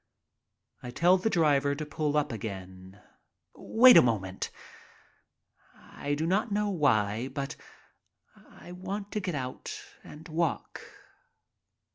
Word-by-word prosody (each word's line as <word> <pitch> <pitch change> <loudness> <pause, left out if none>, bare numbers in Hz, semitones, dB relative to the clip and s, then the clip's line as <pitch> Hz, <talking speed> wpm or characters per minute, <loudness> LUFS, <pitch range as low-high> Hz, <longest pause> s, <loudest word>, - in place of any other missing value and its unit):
I 125 - -7
tell 175 +9 +3
the 220 - 0
driver 145 -6 +2
to 155 +1 -5
pull 150 -1 -1
up 150 - 0
again. 95 -3 -8 0.5
"Wait 250 +2 +6
a - - +10
moment." 100 -6 -2 1.3
I 145 0 -5
do 155 +2 -2
not 205 +6 0
know 205 0 0
why, 115 - +1
but 135 0 -5 0.9
I - - -14
want 195 +3 -6
to 210 - -2
get 180 -5 -3
out 130 -2 -5 0.2
and 155 +3 -12
walk. 165 0 -2
150 Hz, 120 wpm, -29 LUFS, 120-180 Hz, 1.3 s, a